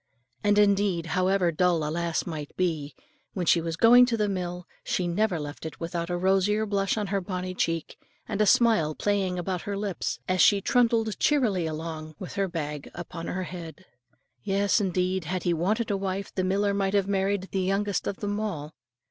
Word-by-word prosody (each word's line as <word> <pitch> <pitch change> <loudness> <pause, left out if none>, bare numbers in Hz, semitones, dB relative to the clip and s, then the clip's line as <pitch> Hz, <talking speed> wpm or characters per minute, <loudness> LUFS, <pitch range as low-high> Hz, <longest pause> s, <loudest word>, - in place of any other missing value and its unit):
And 205 0 +3
indeed, 200 -4 +3
however 185 +1 +2
dull 170 -2 +1
a - - -2
lass 170 0 -1
might 155 -4 -6
be, 155 -6 -1 0.4
when 180 -3 -2
she 170 - +4
was 165 0 -3
going 245 +5 +7
to 235 -2 0
the 210 -1 +1
mill, 180 -2 -3 0.2
she 180 - -1
never 180 0 +1
left 145 0 -7
it 160 - -7
without 170 0 -3
a 175 - -1
rosier 195 +4 +2
blush 200 -1 0
on 210 - 0
her 195 - +1
bonnie 185 0 -4
cheek, 165 -3 -2 0.3
and 205 - -1
a 210 - +4
smile 190 -10 +4
playing 195 -3 0
around 180 0 -2
her 200 -1 -4
lips, 200 -3 -2
as 185 0 +2
she 205 - +6
trundled 225 -1 +2
cheerily 220 - +2
along 155 0 -6
with 185 - -7
her 195 -1 0
bag 150 -4 -5
upon 170 -1 -7
her 185 +1 -2
head. 175 +1 -8 0.6
Yes, 200 - +1
indeed, 185 -1 0
had 180 +3 -3
he 175 - +2
wanted 210 +7 0
a 200 - +1
wife, 195 0 -3
the 185 - -1
miller 200 +2 +1
might 195 0 0
have 195 -1 +2
married 195 -1 0
the 190 - 0
youngest 195 +2 0
of 195 - -4
them 205 0 -2
all. 160 -8 -4
185 Hz, 195 wpm, -27 LUFS, 170-200 Hz, 0.6 s, going